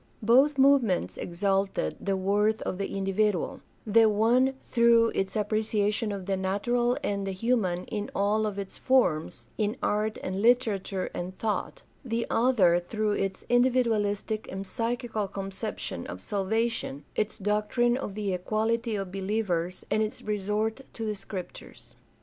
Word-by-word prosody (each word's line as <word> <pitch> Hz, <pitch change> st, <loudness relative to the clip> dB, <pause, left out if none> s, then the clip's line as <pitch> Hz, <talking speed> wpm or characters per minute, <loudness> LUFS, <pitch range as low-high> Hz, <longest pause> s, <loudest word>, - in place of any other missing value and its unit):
Both 265 Hz, +6 st, +5 dB
move 275 Hz, +1 st, +6 dB
ments 190 Hz, -7 st, -1 dB
exalted 195 Hz, -, -1 dB
the 195 Hz, -1 st, 0 dB
worth 205 Hz, +3 st, +1 dB
of 185 Hz, -, -3 dB
the 195 Hz, -, -1 dB
individual: 195 Hz, -1 st, 0 dB, 0.2 s
the 220 Hz, +1 st, +5 dB
one 240 Hz, +5 st, +3 dB
through 235 Hz, -1 st, +4 dB
its 195 Hz, 0 st, -2 dB
appreciation 215 Hz, 0 st, 0 dB
of 195 Hz, -2 st, -5 dB
the 195 Hz, 0 st, 0 dB
natural 240 Hz, +6 st, 0 dB
and 200 Hz, -1 st, -1 dB
the 195 Hz, -, -2 dB
human 190 Hz, -4 st, 0 dB
in 210 Hz, -2 st, -4 dB
all 210 Hz, +2 st, +2 dB
of 205 Hz, -1 st, -4 dB
its 195 Hz, -1 st, -6 dB
forms, 240 Hz, -12 st, +1 dB
in 210 Hz, 0 st, 0 dB
art 215 Hz, +1 st, 0 dB
and 190 Hz, +1 st, -2 dB
literature 215 Hz, -5 st, +1 dB
and 180 Hz, +2 st, -5 dB
thought; 215 Hz, -2 st, -3 dB, 0.2 s
the 235 Hz, -2 st, -1 dB
other 225 Hz, -8 st, +4 dB
through 215 Hz, +4 st, -2 dB
its 195 Hz, -2 st, -2 dB
individualistic 225 Hz, -4 st, +1 dB
and 195 Hz, +1 st, -5 dB
psychical 230 Hz, -1 st, -2 dB
conception 195 Hz, -, -5 dB
of 90 Hz, -, -7 dB
salvation, 205 Hz, -, -2 dB
its 215 Hz, 0 st, -1 dB
doctrine 210 Hz, +4 st, +1 dB
of 250 Hz, -7 st, -4 dB
the 205 Hz, -3 st, -1 dB
equality 220 Hz, +5 st, 0 dB
of 195 Hz, -2 st, -4 dB
believers, 190 Hz, -3 st, -2 dB
and 215 Hz, -, +2 dB
its 215 Hz, 0 st, -3 dB
resort 210 Hz, +3 st, -1 dB
to 225 Hz, -, -5 dB
the 215 Hz, -, -1 dB
Scriptures. 190 Hz, -2 st, -9 dB
210 Hz, 145 wpm, -28 LUFS, 195-230 Hz, 0.2 s, move